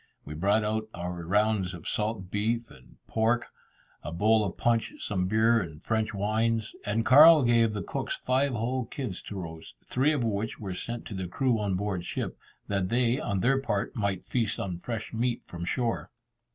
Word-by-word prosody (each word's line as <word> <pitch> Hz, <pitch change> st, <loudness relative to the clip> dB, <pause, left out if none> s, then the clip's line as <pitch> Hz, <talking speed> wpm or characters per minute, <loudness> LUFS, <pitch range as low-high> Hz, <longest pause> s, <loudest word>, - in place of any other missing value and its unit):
We 75 Hz, -, -6 dB
brought 100 Hz, +7 st, +2 dB
out 110 Hz, +1 st, -1 dB
our 90 Hz, 0 st, -4 dB
rounds 100 Hz, 0 st, +1 dB
of 85 Hz, -, -8 dB
salt 105 Hz, -3 st, -2 dB
beef 115 Hz, +3 st, -1 dB
and 65 Hz, -, -17 dB
pork, 115 Hz, +2 st, +1 dB, 0.5 s
a -, -, -6 dB
bowl 110 Hz, +6 st, +3 dB
of 95 Hz, -, -4 dB
punch, 115 Hz, -2 st, +1 dB
some 90 Hz, -3 st, -1 dB
beer, 110 Hz, +3 st, +4 dB
and 80 Hz, -5 st, -7 dB
French 110 Hz, -1 st, 0 dB
wines; 110 Hz, +2 st, 0 dB
and 110 Hz, +3 st, 0 dB
Carl 150 Hz, +4 st, +9 dB
gave 115 Hz, -2 st, +4 dB
the 105 Hz, -3 st, -3 dB
cooks -, -, -3 dB
five 130 Hz, +2 st, +1 dB
whole 120 Hz, +2 st, -1 dB
kids 115 Hz, -6 st, -5 dB
to 105 Hz, -, -8 dB
roast, 80 Hz, -7 st, -8 dB
three 135 Hz, +4 st, +2 dB
of 145 Hz, -5 st, 0 dB
which 110 Hz, -1 st, -2 dB
were 95 Hz, -3 st, -4 dB
sent 120 Hz, +5 st, -5 dB
to -, -, -7 dB
the 95 Hz, -2 st, -3 dB
crew 120 Hz, +5 st, +1 dB
on 100 Hz, -3 st, 0 dB
board 95 Hz, -2 st, -2 dB
ship, -, -, -3 dB, 0.3 s
that 100 Hz, -2 st, 0 dB
they, 120 Hz, +2 st, +2 dB
on 100 Hz, -9 st, -1 dB
their 135 Hz, +2 st, +3 dB
part, 100 Hz, -6 st, -2 dB
might 100 Hz, -4 st, -1 dB
feast 115 Hz, -5 st, -1 dB
on 90 Hz, -3 st, -3 dB
fresh 110 Hz, +3 st, -5 dB
meat 120 Hz, +1 st, -1 dB
from 85 Hz, 0 st, -6 dB
shore. 115 Hz, +5 st, -1 dB
110 Hz, 190 wpm, -28 LUFS, 95-115 Hz, 0.5 s, Carl